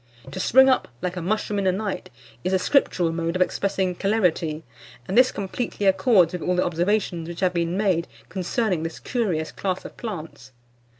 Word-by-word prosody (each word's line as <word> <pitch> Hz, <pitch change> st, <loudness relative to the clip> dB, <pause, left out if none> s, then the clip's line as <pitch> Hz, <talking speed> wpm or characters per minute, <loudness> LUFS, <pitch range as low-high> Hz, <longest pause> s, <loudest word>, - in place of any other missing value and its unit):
To -, -, -6 dB
spring 265 Hz, +2 st, +6 dB
up 260 Hz, -, +3 dB, 0.2 s
"like 180 Hz, 0 st, -2 dB
a 180 Hz, -, -4 dB
mushroom 210 Hz, +2 st, -1 dB
in 195 Hz, -, 0 dB
a -, -, +5 dB
night" 200 Hz, +1 st, -4 dB, 0.3 s
is 185 Hz, -, -1 dB
a -, -, +5 dB
scriptural 185 Hz, -, +2 dB
mode 165 Hz, +1 st, -2 dB
of 185 Hz, -, 0 dB
expressing 190 Hz, -1 st, -1 dB
celerity; 175 Hz, -6 st, 0 dB, 0.4 s
and 190 Hz, -, -2 dB
this 255 Hz, +1 st, +6 dB
completely 205 Hz, +1 st, -3 dB
accords 190 Hz, -, +4 dB
with 180 Hz, -, -4 dB
all 180 Hz, -, 0 dB
the 180 Hz, -, +2 dB
observations 175 Hz, -1 st, 0 dB
which 170 Hz, +1 st, -7 dB
have 185 Hz, -1 st, +2 dB
been 170 Hz, +1 st, -1 dB
made 185 Hz, -5 st, +1 dB, 0.2 s
concerning 185 Hz, -1 st, -1 dB
this 165 Hz, 0 st, -4 dB
curious 185 Hz, -11 st, -1 dB
class 185 Hz, -1 st, -3 dB
of -, -, -9 dB
plants. 155 Hz, -, -7 dB
185 Hz, 185 wpm, -24 LUFS, 170-205 Hz, 0.4 s, spring